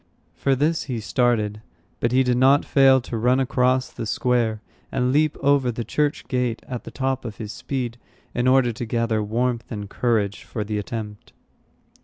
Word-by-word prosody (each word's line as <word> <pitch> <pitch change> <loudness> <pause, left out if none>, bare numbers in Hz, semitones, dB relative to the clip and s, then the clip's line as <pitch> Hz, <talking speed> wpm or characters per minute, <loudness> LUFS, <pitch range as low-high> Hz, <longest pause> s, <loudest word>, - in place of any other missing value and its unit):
For 135 -1 +1
this 155 +5 0
he 125 -4 -3
started; 110 -2 0 0.4
but 120 - 0
he 130 +1 +4
did 125 -1 +1
not 135 +3 +5
fail 135 -1 +5
to 120 -1 -5
run 125 +4 +3
across 130 0 +1
the 115 - -5
square 115 -2 +1 0.3
and 125 -1 +1
leap 155 +1 +2
over 140 -3 +3
the 115 0 -4
church 145 +6 -1
gate 125 -3 -1
at 125 -2 -6
the - - -6
top 135 -1 -2
of 110 -3 -7
his 105 -2 -6
speed, 120 -3 -4 0.3
in 120 +1 0
order 130 -2 +4
to 120 +2 -5
gather 115 -1 0
warmth 120 +3 -1
and 105 -2 -5
courage 105 -2 0
for 110 - -4
the 105 0 -2
attempt. 105 0 -7
125 Hz, 180 wpm, -23 LUFS, 110-130 Hz, 0.4 s, not